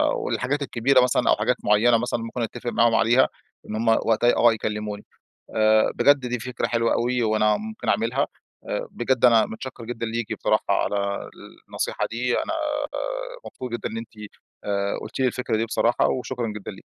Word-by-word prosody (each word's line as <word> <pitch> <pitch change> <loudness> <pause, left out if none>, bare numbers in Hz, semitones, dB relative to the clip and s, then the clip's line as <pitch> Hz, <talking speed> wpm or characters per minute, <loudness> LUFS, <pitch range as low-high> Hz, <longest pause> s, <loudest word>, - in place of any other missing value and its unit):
والحاجات 140 +3 -2
الكبيرة 130 0 +3
مثلًا 125 - +2
أو - - +6
حاجات - - +1
معيّنة 115 +3 +4
مثلًا 120 +1 -2
ممكن 115 +2 -5
أتفق 120 +1 -4
معاهم 120 -1 +3
عليها، 120 +4 +4 0.4
إن 110 - -3
همّ 115 +1 -2
وقتها 115 +1 +3
آه 120 -1 +5
يكلموني. 105 -1 -4 0.5
آآ، 110 0 +4
بجد 145 0 +5
دي 125 0 -2
فكرة 125 +2 -3
حلوة 115 -1 +1
أوي 125 0 0
وأنا 110 -1 +2
ممكن 220 +1 -6
أعملها. 115 +7 +1 0.4
آآ، - - -2
بجد 125 0 +1
أنا 115 -3 +6
متشَكّر 120 +1 -8
جدًا 115 -1 -4
ليكِ 115 0 -3
بصراحة - - +1
على 100 -1 0 0.4
النصيحة - - -2
دي. 120 +1 0
أنا 325 - -1 0.9
مبسوط 125 -2 -8
جدًا 120 - -3
إن - - -6
أنتِ، 115 0 -6 0.6
آآ، 100 -1 -1
قُلتِ - - -7
لي 130 - +3
الفكرة 125 -2 -1
دي 110 - 0
بصراحة، 115 +1 +2
وشكرًا 125 -2 -2
جدًا 105 -2 -7
ليكِ. - - -13
115 Hz, 175 wpm, -24 LUFS, 110-125 Hz, 0.9 s, أو